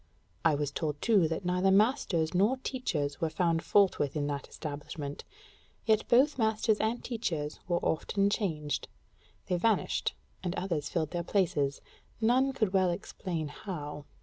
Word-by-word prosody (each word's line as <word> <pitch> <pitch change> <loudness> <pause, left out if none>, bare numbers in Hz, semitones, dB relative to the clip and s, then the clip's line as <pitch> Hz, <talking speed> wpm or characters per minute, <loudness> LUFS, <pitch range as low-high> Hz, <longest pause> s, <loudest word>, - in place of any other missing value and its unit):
I 155 - +4
was 145 -1 -1
told 150 -1 -2
too 205 -8 +4
that 165 +3 -3
neither 180 +2 +2
masters 195 - +2
nor 205 +8 +3
teachers 160 - -2
were 165 - +1
found 165 -1 +1
fault 200 +1 +3
with 145 0 -1
in 145 -1 0
that 145 -1 -3
establishment: 145 -1 -6 0.6
yet 215 -1 +3
both 265 +3 +4
masters 220 -1 +2
and 225 +3 0
teachers 165 -11 -3
were 175 -1 +2
often 200 +5 +1
changed; 155 -9 -1 0.6
they 180 - 0
vanished 220 +3 +1 0.3
and 180 0 -2
others 165 -6 -2
filled 160 -3 -1
their 175 - -1
places, 160 -7 0 0.4
none 250 +4 +3
could 215 -7 0
well 190 -2 +4
explain 170 -3 -4
how. 150 -3 -6
175 Hz, 150 wpm, -30 LUFS, 150-215 Hz, 0.6 s, I